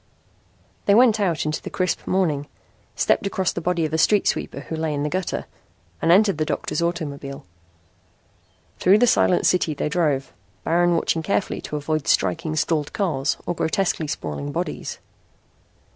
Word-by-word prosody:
They 200 - +6
went 230 -2 +5
out 175 -7 0
into 155 0 -2
the - - -6
crisp 185 -1 -2
morning, 155 -7 0 0.5
stepped 200 - +2
across 190 -2 -1
the 175 - -4
body 170 -1 0
of 155 - -4
a 160 - +1
street 205 +5 +3
sweeper 140 - -2
who 160 - -6
lay 160 -1 -1
in 145 - -2
the 150 - -1
gutter, 185 +2 -2 0.6
and 165 - +3
entered 195 -2 +4
the - - +2
doctor's 155 - -2
automobile. 145 - -4 1.3
Through 190 +3 +5
the 245 - +4
silent 185 -6 +3
city 170 -4 +2
they 150 - -2
drove, 150 -5 0 0.3
Baron 175 +1 +2
watching 165 0 0
carefully 195 +4 -1
to - - -6
avoid 150 0 -2
striking 160 -2 +1
stalled 155 -1 0
cars 165 -10 0
or 175 - -1
grotesquely 165 -1 0
sprawling 70 - -4
bodies. - - -4
165 Hz, 160 wpm, -23 LUFS, 150-185 Hz, 1.3 s, They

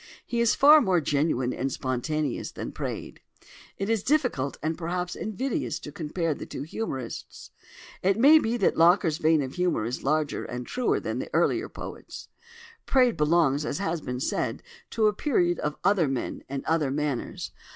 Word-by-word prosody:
He 235 -1 -1
is 235 - +3
far 300 +2 +8
more 185 -6 +3
genuine 140 -4 0
and 135 +1 -2
spontaneous 130 +3 -2
than - - -5
Praed. - - -6 0.6
It 195 - -2
is 225 -2 +1
difficult 250 - 0
and 160 +1 0
perhaps 180 +1 -3
invidious 220 - -2
to 145 - -9
compare 160 +1 -2
the - - -8
two 135 - -6
as 155 - -13
"humorists." 135 - -6 0.5
It 195 +2 +2
may 290 +7 +7
be 235 -3 -1
that 200 - +2
Locker's 165 -2 +4
vein 155 -2 +3
of 130 0 -6
humour 180 -11 0
is 120 +2 -4
larger 150 +1 0
and 125 0 -6
truer 250 - 0
than - - -3
the - - -5
earlier - - +2
poet's. - - -9 0.6
Praed 250 -4 +4
belongs, 150 -2 +2
as 150 - -2
has 170 -4 -2
been 125 -2 -4
said, 135 - -2 0.3
to 225 -1 +1
a 210 - +4
period 180 - +1
of 150 0 -2
other 190 -5 +3
men 135 -2 -3
and 135 0 -4
other 160 -3 +1
manners. 145 -2 -3
165 Hz, 175 wpm, -26 LUFS, 140-205 Hz, 0.6 s, far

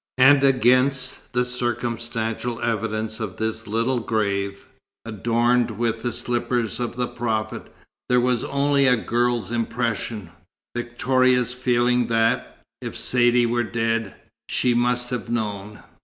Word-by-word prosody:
And 135 +2 +6
against 130 0 +2
the 125 0 +1
circumstantial 120 -1 -2
evidence 110 -1 -2
of 105 -5 -5
this 110 0 -3
little 115 +4 0
grave, 100 -3 -2 0.4
adorned 120 +3 +1
with 115 -1 -1
the 120 +1 -1
slippers 120 -2 -2
of 120 -1 -3
the 125 0 0
Prophet, 110 -3 -3 0.4
there 125 0 +4
was 125 -1 +1
only 140 0 +2
a 125 -1 +5
girl's 120 0 0
impression 115 -5 -2 0.4
Victoria's 125 +1 +1
feeling 125 -1 +1
that, 115 -1 0 0.2
if - - -5
Saidee 120 -1 +3
were 120 +1 +1
dead, 115 -2 -1 0.3
she 125 - +2
"must 120 +1 0
have 125 -2 -4
known." 105 -3 -4
120 Hz, 125 wpm, -23 LUFS, 115-125 Hz, 0.4 s, And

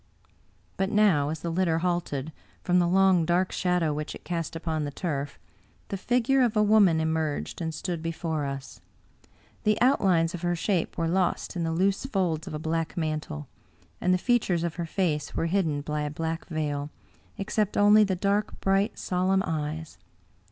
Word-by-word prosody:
But 195 0 0
now, 195 -10 +3
as 155 +1 -4
the 170 - -3
litter 170 -1 +1
halted, 165 -4 -2 0.3
from 180 0 +3
the 175 - +3
long, 190 -1 +4
dark 175 +3 +1
shadow 180 -4 +1
which 150 +1 -4
it - - -12
cast 165 -2 -3
upon 160 -2 -2
the 145 - -2
turf, 145 -2 -4 0.5
the - - -2
figure 245 +6 +2
of 235 -3 +2
a 210 - +5
woman 205 -6 +5
emerged 160 0 -2
and 160 -1 -2
stood 170 +1 -4
before 165 -2 -2
us. 135 0 -7 0.8
The 215 0 +2
outlines 190 -10 +3
of 175 - -5
her 175 0 0
shape 175 0 -1
were 165 -1 0
lost 185 +2 0
in 175 - -2
the 165 - -1
loose 195 +8 +1
folds 180 - -1
of 160 - -5
a - - -1
black 160 +2 -2
mantle, 155 - -3 0.5
and 180 - +2
the 185 - +4
features 190 -6 +1
of 170 -2 -1
her 170 -1 -3
face 155 -5 -1
were - - 0
hidden 165 -5 0
by 150 +1 -3
a 150 - -2
black 160 +2 -4
veil, 150 -3 -2 0.5
except 210 +1 -1
only 210 +1 +7
the 195 -2 0
dark 200 +3 0
bright, 195 +3 +1
solemn 190 +1 +1
eyes. 155 - -4
170 Hz, 180 wpm, -27 LUFS, 160-195 Hz, 0.8 s, only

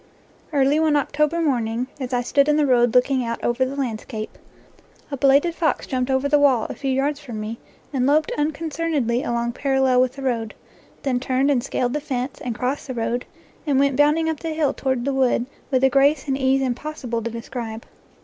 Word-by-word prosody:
Early 285 0 +3
one 315 -2 +3
October 300 +3 +1
morning, 240 -5 0
as 255 -2 -4
I 245 -1 +1
stood 280 +4 +2
in 300 - +3
the 300 - +3
road 245 -3 +3
looking 255 +1 +3
out 230 0 -3
over 240 +2 +1
the 260 +2 -3
landscape, 225 -4 -4 0.8
a 280 - -3
belated 280 +5 +4
fox 320 -5 0
jumped 255 0 -2
over 265 +1 +1
the 295 +1 +4
wall 265 -6 +4
a - - -5
few 275 - -4
yards 280 +2 0
from 235 -7 -7
me 215 +2 -5 0.3
and 255 -1 +1
loped 300 +2 +2
unconcernedly 300 -4 -1
along 235 -4 -1
parallel 265 -1 +2
with 255 0 +1
the 275 0 -8
road, 230 -4 -2 0.5
then 255 -3 0
turned 265 +2 +1
and 250 -4 +1
scaled 245 -2 -1
the 295 - -1
fence, 260 -2 -4
and 245 -2 -3
crossed 260 +3 -2
the 260 - -5
road, 235 +1 -2 0.4
and 280 -2 +2
went 275 0 +3
bounding 300 +3 +3
up 320 -2 -2
the 330 - -4
hill 305 -3 +1
toward 260 -2 -1
the 280 - 0
woods 255 -2 +2 0.2
with 260 -1 +1
a 265 - +6
grace 280 +2 +3
and 270 - +1
ease 270 0 +2
im 255 -2 +1
possible 250 -4 -5
to 235 - -3
describe. 230 -1 -6
265 Hz, 205 wpm, -22 LUFS, 245-285 Hz, 0.8 s, a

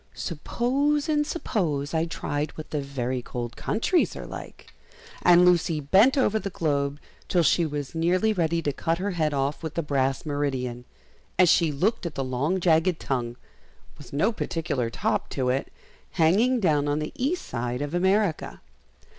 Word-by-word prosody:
"SUPPOSE 270 - 0
and 295 -1 +1
suppose 155 - -2
I 160 0 +1
tried 150 -2 -3
what 155 - -8
the 150 - -1
very 130 -2 -3
cold 120 -1 -6
countries 330 +10 0
are - - -7
like!" - - -10 0.5
And 175 0 +6
Lucy 175 -2 +3
bent 195 - +4
over 220 -5 +2
the 200 - -4
globe 145 -5 -1 0.3
till 175 -2 +2
she 165 +2 +3
was 145 -2 -5
nearly 180 +6 +2
ready 165 -3 0
to 145 - -1
cut 165 +3 -1
her 200 +3 -2
head 160 -4 0
off 140 0 -1
with 160 -2 -5
the 170 - -1
brass 135 -1 0
meridian, 130 -4 -2 0.5
as 180 -1 +6
she 165 -2 +4
looked 185 +7 0
at 160 - -8
the 135 - -1
long 135 +8 -1
jagged 170 0 +2
tongue, 120 -3 -2 0.6
with 145 - -12
no 175 +11 +2
particular 155 - -2
top - - -1
to 130 -2 -1
it, 130 +2 -1 0.4
hanging 205 +10 +3
down 150 -7 +2
on 145 0 +1
the 150 0 -4
east 295 +8 -1
side 125 +2 -3
of 145 +2 -5
America. 190 0 +1
160 Hz, 170 wpm, -26 LUFS, 140-185 Hz, 0.6 s, And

